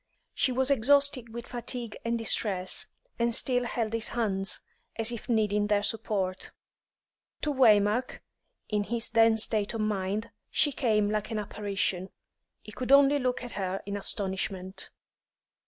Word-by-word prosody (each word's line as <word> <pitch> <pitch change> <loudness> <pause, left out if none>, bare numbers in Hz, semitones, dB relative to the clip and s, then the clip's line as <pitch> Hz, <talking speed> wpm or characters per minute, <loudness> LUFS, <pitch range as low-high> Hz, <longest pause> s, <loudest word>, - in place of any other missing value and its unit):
She 260 - +1
was 260 +2 +2
exhausted 275 -1 +3
with 235 +1 -7
fatigue 240 -2 -4
and 235 0 0
distress, 200 -4 +1 0.3
and 235 0 +2
still 250 -1 +2
held 230 -2 -2
his 230 -1 0
hands, 195 -5 -1 0.3
as 225 +1 +3
if 235 +1 -7
needing 210 -2 +1
their 205 -1 +2
support. 195 -4 -2 0.9
To 300 - +1
Waymark, 220 -1 +3 0.5
in 210 -1 -1
his 235 +1 -2
then 225 -1 +5
state 215 0 +1
of 225 - -2
mind, 210 +1 -2 0.2
she 295 - +2
came 215 -6 +1
like 215 0 -2
an 225 - -3
apparition. 195 -3 -2 0.5
He 215 - -10
could 255 +4 -4
only 280 +1 +6
look 250 -1 -1
at 245 - -7
her 190 -1 -3
in 200 0 -4
astonishment. 190 -1 -3
220 Hz, 145 wpm, -28 LUFS, 205-240 Hz, 0.9 s, only